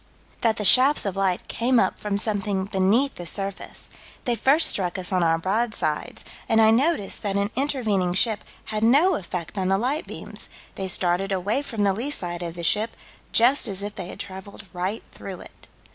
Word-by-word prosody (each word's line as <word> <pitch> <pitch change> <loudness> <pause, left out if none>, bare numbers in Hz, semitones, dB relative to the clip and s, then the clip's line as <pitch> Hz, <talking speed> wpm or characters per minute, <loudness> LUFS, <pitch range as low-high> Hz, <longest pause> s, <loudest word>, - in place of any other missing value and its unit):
That 225 -2 +2
the 210 - -1
shafts 260 +8 +6
of 200 -2 -2
light 190 -2 0
came 240 +1 +1
up 190 - 0
from 205 -1 -2
something 205 -2 -1
beneath 200 +8 +2
the 175 - -7
surface 195 +2 -4 0.3
"They 245 - +1
first 270 +8 +3
struck 180 -2 0
us 185 0 -4
on 185 -1 +2
our 165 -1 +3
broadside, 190 -4 -2 0.3
and 225 -1 +4
I 220 0 +6
noticed 250 - +2
that 200 -2 -2
an 200 +1 0
intervening 220 -10 0
ship 215 +1 +1 0.2
had 215 -1 -3
no 290 +11 +5
effect 180 - -4
on 185 - 0
the 195 +1 +2
light 265 +9 -1
beams: - - -6 0.2
they 190 - -4
started 185 +1 +1
away 200 +7 0
from 225 -7 -3
the 200 -1 +3
lee 235 +8 -3
side 175 -11 -4
of 170 -1 -5
the 170 - -7
ship, 215 +6 +1 0.3
just 245 +3 +5
as 200 -1 -4
if 205 0 -4
they 190 -4 -6
had - - -9
traveled 200 +1 -8
right 185 +5 -3
through 190 -3 -8
it." - - -15
200 Hz, 195 wpm, -24 LUFS, 185-230 Hz, 0.3 s, shafts